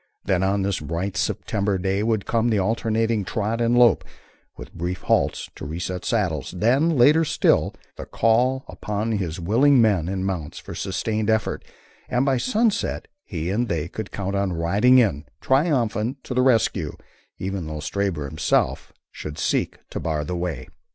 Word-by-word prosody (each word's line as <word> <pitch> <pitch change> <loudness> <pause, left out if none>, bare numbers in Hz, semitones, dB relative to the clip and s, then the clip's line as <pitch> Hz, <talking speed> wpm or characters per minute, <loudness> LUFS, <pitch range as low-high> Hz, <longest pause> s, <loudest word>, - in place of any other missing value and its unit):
Then 95 -2 +1
on 95 +1 +1
this 100 -1 -1
bright 85 +6 -3
September 100 +1 -1
day 95 +2 0
would 110 -2 0
come 115 0 +1
the 110 - +2
alternating 110 +1 0
trot 110 +3 -2
and 120 +1 +2
lope, 120 - +5 0.5
with - - -10
brief 90 +2 -4
halts - - 0
to - - -11
reset 90 +4 -4
saddles; 95 - -1
then, 135 - +2
later 150 +7 +6
still, 155 - +2 0.2
the - - -7
call 125 +4 +2
upon 105 +2 -3
his 95 -5 -2
willing 125 +10 +4
men 100 -7 +3
and 95 0 -2
mounts 90 -6 -4
for - - -8
sustained 105 +3 -2
effort, 110 -2 0 0.5
and 125 +1 +1
by 135 -2 +2
sunset 220 - 0 0.2
he 85 -2 -3
and 120 +4 0
they 80 -2 -1
could 105 +3 -6
count 100 -1 -4
on 100 -2 0
riding 100 +10 +4
in, 95 - +2
triumphant, 130 -4 +1
to - - -5
the 125 - +2
rescue, 125 -4 +2 0.4
even 95 -3 -4
though 75 -1 -5
Stabber 85 -1 -2
himself 75 +3 0 0.2
should 75 0 -7
seek 85 - -1
to - - -3
bar 75 -2 -2
the 90 - -3
way. 85 -8 -4
100 Hz, 165 wpm, -23 LUFS, 90-115 Hz, 0.5 s, later